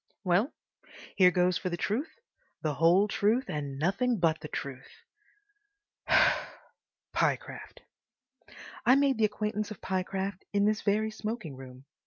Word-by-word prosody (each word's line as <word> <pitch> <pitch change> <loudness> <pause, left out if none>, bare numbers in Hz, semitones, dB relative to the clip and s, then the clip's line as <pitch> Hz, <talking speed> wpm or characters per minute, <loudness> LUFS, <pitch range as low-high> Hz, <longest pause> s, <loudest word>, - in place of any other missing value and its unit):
Well, 195 - +2 0.6
here 185 -2 +7
goes 180 0 +2
for 185 - -3
the 175 - -3
truth, 245 - -1 0.5
the 155 -2 0
whole 175 +7 +4
truth, 220 +5 +1
and 145 -3 -4
nothing 225 - +1
but 165 -3 +2
the 150 - -7
truth! 135 -3 -6 2.2
Pyecraft—. - - -2 1.0
I 250 +3 +6
made 275 -3 +2
the 220 - +5
acquaintance 210 0 -2
of 215 - -8
Pyecraft 190 0 -3
in 200 0 +3
this 215 0 +1
very 215 +1 +1
smoking 215 - -5
room. 130 0 -12
195 Hz, 130 wpm, -29 LUFS, 165-215 Hz, 2.2 s, here